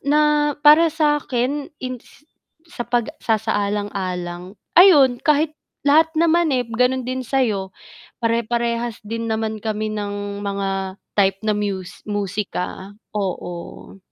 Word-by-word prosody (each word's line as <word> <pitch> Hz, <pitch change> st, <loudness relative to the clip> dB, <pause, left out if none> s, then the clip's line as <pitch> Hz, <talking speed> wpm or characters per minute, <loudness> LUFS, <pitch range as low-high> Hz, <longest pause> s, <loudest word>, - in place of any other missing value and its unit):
na 295 Hz, +1 st, +3 dB
para 310 Hz, +3 st, +8 dB
sakin 295 Hz, -3 st, 0 dB, 1.0 s
sa 315 Hz, -9 st, -4 dB
pagsasaalang-alang 205 Hz, -, -2 dB, 0.3 s
ayun 285 Hz, -10 st, +7 dB
kahit 300 Hz, +1 st, +2 dB, 0.4 s
lahat 315 Hz, +3 st, +5 dB
naman 335 Hz, 0 st, +3 dB
eh, 250 Hz, -2 st, 0 dB
ganun 250 Hz, +2 st, +1 dB
din 255 Hz, 0 st, -2 dB
sa'yo, 220 Hz, -7 st, 0 dB, 0.5 s
pare-parehas 235 Hz, 0 st, -1 dB
din 230 Hz, +2 st, -4 dB
naman 220 Hz, 0 st, -2 dB
kami 215 Hz, 0 st, -2 dB
ng 205 Hz, -1 st, -4 dB
mga 195 Hz, -1 st, -3 dB, 0.2 s
type 195 Hz, -1 st, +2 dB
na 215 Hz, -, +2 dB
mus 195 Hz, -3 st, -4 dB
musika, 200 Hz, -1 st, -3 dB, 0.2 s
oo. 180 Hz, -3 st, -5 dB
225 Hz, 100 wpm, -21 LUFS, 200-275 Hz, 1.0 s, para